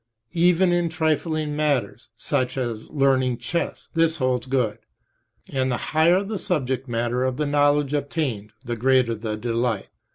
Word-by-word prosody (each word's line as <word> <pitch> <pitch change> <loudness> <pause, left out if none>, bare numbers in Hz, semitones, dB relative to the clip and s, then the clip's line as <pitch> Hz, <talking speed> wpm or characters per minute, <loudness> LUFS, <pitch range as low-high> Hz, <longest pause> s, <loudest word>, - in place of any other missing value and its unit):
Even 175 +1 +4
in 175 -1 +1
trifling 155 -1 -1
matters, 145 -8 -1
such, 130 +1 -1
as 120 -4 -3
learning 130 -4 +2
chess, 170 +7 -3
this 165 0 +2
holds 130 -3 0
good, 125 -5 0 0.7
and 130 -1 0
the 120 - 0 0.2
higher 170 +5 +4
the 205 0 -4
subject 135 -6 -1
matter 120 +1 -1
of 130 -1 -1
the 150 - 0
knowledge 145 0 +2
obtained 140 -8 -2
the 120 - -2
greater 130 0 +3
the 110 -1 -4
delight. 115 -1 -1
135 Hz, 150 wpm, -23 LUFS, 120-155 Hz, 0.7 s, Even